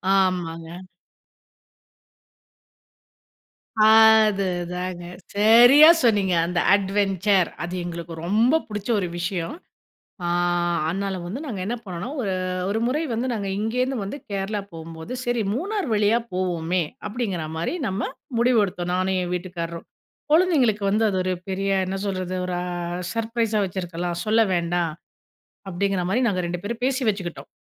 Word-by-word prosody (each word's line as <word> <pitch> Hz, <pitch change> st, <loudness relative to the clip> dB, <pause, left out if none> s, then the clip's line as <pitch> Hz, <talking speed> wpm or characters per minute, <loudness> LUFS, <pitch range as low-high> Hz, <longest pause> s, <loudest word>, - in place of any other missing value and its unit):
ஆமாங்க. 175 Hz, -2 st, -1 dB, 3.0 s
அதுதாங்க 195 Hz, -5 st, +4 dB, 0.3 s
சரியா 240 Hz, +8 st, +8 dB, 0.2 s
சொன்னீங்க. 205 Hz, -6 st, +3 dB
அந்த 175 Hz, 0 st, -1 dB, 0.2 s
அட்வென்ச்சர் 195 Hz, -1 st, +1 dB
அது 175 Hz, +1 st, -5 dB
எங்களுக்கு 170 Hz, -1 st, -6 dB
ரொம்ப 230 Hz, -, +3 dB
புடிச்ச 210 Hz, 0 st, -6 dB
ஒரு 185 Hz, -, -2 dB
விஷயம். 175 Hz, -, -3 dB, 0.7 s
ஆ -, -, -1 dB, 0.6 s
அதனால 195 Hz, +2 st, -2 dB
வந்து 195 Hz, +10 st, -5 dB
நாங்க 225 Hz, -9 st, -5 dB
என்ன 230 Hz, +4 st, -2 dB
பண்ணோம், 190 Hz, -, -5 dB
ஒரு, 195 Hz, -5 st, -1 dB, 0.4 s
ஒரு 215 Hz, +2 st, 0 dB
முறை 285 Hz, +5 st, 0 dB
வந்து 235 Hz, +3 st, -1 dB
நாங்க 205 Hz, -3 st, -3 dB
இங்கேருந்து 250 Hz, +5 st, -1 dB
வந்து 200 Hz, +8 st, -5 dB
கேரளா 200 Hz, +1 st, -2 dB
போகும்போது, 160 Hz, +4 st, -8 dB
"சரி 240 Hz, -1 st, 0 dB
மூணார் 390 Hz, -, -2 dB
வழியா 210 Hz, +2 st, +3 dB
போவோமே," 180 Hz, -1 st, 0 dB, 0.3 s
அப்டிங்கிற 205 Hz, -6 st, -3 dB
மாரி 170 Hz, -, -2 dB
நம்ம 190 Hz, +3 st, -2 dB, 0.4 s
முடிவெடுத்தோம் 205 Hz, -7 st, +1 dB
நானும் 185 Hz, +1 st, +1 dB
என் 175 Hz, -, -4 dB
வீட்டுக்காரரும். 170 Hz, -2 st, -5 dB, 0.5 s
குழந்தைங்களுக்கு 285 Hz, -, +3 dB
வந்து 215 Hz, +3 st, +2 dB
அது 190 Hz, -, -1 dB
ஒரு 185 Hz, -, -1 dB, 0.2 s
பெரிய 195 Hz, +1 st, -1 dB, 0.2 s
என்ன 190 Hz, +1 st, -2 dB
சொல்றது 185 Hz, -1 st, -3 dB
ஒரு 180 Hz, -1 st, -2 dB, 0.5 s
சர்ப்ரைஸா 230 Hz, -1 st, 0 dB
வச்சிருக்கலாம். 175 Hz, -2 st, -4 dB
சொல்ல 220 Hz, +1 st, +3 dB
வேண்டாம் 170 Hz, -1 st, 0 dB, 0.8 s
அப்டிங்கிற 190 Hz, 0 st, -1 dB
மாரி 230 Hz, +6 st, +2 dB
நாங்க 185 Hz, -4 st, 0 dB
2 175 Hz, 0 st, -4 dB
பேரும் 230 Hz, +3 st, -5 dB
பேசி 265 Hz, 0 st, 0 dB
வச்சுக்கிட்டோம். 190 Hz, -5 st, -3 dB
195 Hz, 125 wpm, -23 LUFS, 180-225 Hz, 3.0 s, சரியா